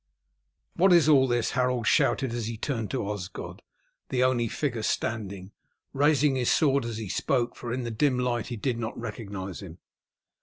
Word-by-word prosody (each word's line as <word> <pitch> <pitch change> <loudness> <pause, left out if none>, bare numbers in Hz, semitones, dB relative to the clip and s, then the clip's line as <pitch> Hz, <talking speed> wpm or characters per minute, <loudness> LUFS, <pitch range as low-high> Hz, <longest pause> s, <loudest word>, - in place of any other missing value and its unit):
"What 185 +1 +5
is 170 -3 +5
all 135 -4 +6
this?" 120 -2 0
Harold 125 -2 0
shouted 130 +1 +2
as 120 -2 -3
he 115 -1 -4
turned 115 -3 -3
to 130 -7 -2
Osgod, 100 -3 -6 0.5
the 125 -1 +1
only 125 -2 +2
figure 120 -1 -2
standing, 100 -4 -3 0.4
raising 145 0 +3
his 125 -2 +1
sword 140 -4 +3
as 115 -2 -4
he 110 -2 -5
spoke, 120 +6 0
for 120 - -6
in 125 +1 -2
the 120 - -4
dim 130 +3 +1
light 125 -2 -1
he 120 - -4
did 120 +1 -2
not 110 -2 -4
recognize 100 -5 -6
him. 85 -4 -10
120 Hz, 180 wpm, -27 LUFS, 110-130 Hz, 0.5 s, all